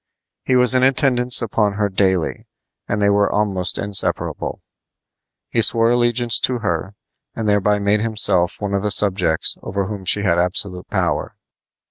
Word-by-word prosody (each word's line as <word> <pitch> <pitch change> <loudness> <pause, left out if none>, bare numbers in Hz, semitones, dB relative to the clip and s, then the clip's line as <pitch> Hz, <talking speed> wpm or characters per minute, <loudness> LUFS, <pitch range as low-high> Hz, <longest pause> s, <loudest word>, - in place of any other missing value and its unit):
He 130 - 0
was 125 0 +5
in 130 - +2
attendance 130 -2 +2
upon 105 -2 -1
her 105 0 -1
daily, 95 -3 -2 0.4
and 105 - -2
they 100 0 +2
were 100 0 +1
almost 100 -4 0
inseparable. 100 -1 -1 0.9
He 115 - +1
swore 115 +1 +2
allegiance 120 -1 +1
to 125 - -1
her 95 -2 -4 0.4
and 110 - -4
thereby 105 0 +1
made 100 +1 0
himself 105 -5 +2
one 100 -1 -4
of 100 - 0
the 105 - -2
subjects 95 -6 +2
over 100 0 -4
whom 100 -1 -7
she 100 +2 +2
had 85 -4 +1
absolute 90 +1 -2
power. - - -2
105 Hz, 155 wpm, -18 LUFS, 95-115 Hz, 0.9 s, was